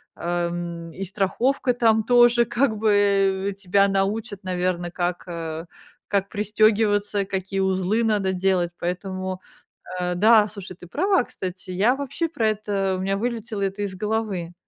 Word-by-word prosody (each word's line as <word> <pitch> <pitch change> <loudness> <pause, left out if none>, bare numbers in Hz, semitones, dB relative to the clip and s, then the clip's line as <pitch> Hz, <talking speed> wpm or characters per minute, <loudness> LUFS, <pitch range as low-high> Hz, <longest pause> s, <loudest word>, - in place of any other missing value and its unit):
э, 175 0 -1
м, 170 -1 -5
и 195 +4 -5
страховка, 235 +7 0
там, 225 -2 +3
тоже, 240 0 +5
как 235 -1 0
бы, 215 +1 +1 0.6
э. - - -4
Тебя 195 0 +2
научат, 200 +2 -1
наверно, 180 -1 -1
как, 175 0 -3
э, 165 -1 -5 0.4
как 200 -1 0
пристегиваться, 210 -1 +2
какие 190 0 -3
узлы 190 +3 +1
надо 205 -4 +1
делать, 180 -2 +1
поэтому, 185 +1 -3 0.6
э, 180 0 -1
да, 215 +3 +5
слушай, 200 -3 -9
ты 180 - -13
права, 375 - +2
кстати, 185 -3 -7
я 200 +8 +2
вообще 280 +4 -2
про 225 -9 0
это 200 -3 -1
у - - -4
меня 195 +1 0
вылетело 230 -1 -3
это 195 +1 -2
из 200 -2 -3
головы. 210 -4 -2
195 Hz, 150 wpm, -23 LUFS, 185-220 Hz, 0.6 s, тоже